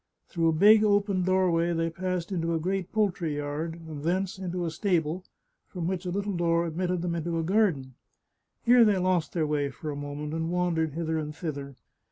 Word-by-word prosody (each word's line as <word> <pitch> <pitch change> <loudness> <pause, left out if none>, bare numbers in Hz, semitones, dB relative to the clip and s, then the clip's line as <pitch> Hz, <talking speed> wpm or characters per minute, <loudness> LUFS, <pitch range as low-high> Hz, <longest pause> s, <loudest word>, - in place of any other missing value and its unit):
Through 165 -2 +1
a - - +4
big, 210 +6 +6
open 200 -2 +2
doorway 175 -2 +2
they 165 0 0
passed 185 +1 -3
into 170 -2 0
a - - 0
great 185 +2 -2
poultry 185 -8 0
yard, 145 +3 -3
and 150 -2 -7
thence 185 +5 -1
into 180 -1 -3
a 165 - -2
stable, 175 -1 0 0.4
from 175 -3 -5
which 185 +1 -2
a - - -1
little 200 +2 -2
door 170 0 +2
admitted 175 +1 -2
them 175 -1 -1
into 170 0 -2
a 165 - 0
garden. 170 -9 +1 0.7
Here 245 0 +7
they 210 -3 +4
lost 180 -3 +1
their 165 -3 +1
way 150 -2 0
for 150 +3 -6
a - - -5
moment, 145 +1 -5
and 160 0 -2
wandered 170 -3 0
hither 160 0 -1
and 150 -1 -5
thither. 140 -5 -5
170 Hz, 200 wpm, -28 LUFS, 160-185 Hz, 0.7 s, Here